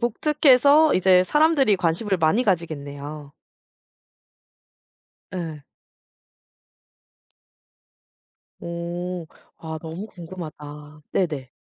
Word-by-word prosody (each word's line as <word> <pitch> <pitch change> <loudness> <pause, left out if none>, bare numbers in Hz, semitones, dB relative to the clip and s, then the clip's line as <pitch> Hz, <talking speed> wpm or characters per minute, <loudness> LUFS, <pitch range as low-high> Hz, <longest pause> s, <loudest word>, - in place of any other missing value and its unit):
독특해서 285 +4 +4
이제 185 0 +4
사람들이 295 - +3
관심을 180 +3 0
많이 165 +10 +2
가지겠네요. 145 -5 -4 2.0
예. 160 -5 -5 3.0
오. 170 0 -5 0.3
아 160 -1 -6
너무 165 +6 -7
궁금하다. 155 -5 -10
네네. 150 -8 -1
170 Hz, 160 characters per minute, -23 LUFS, 155-210 Hz, 3.0 s, 독특해서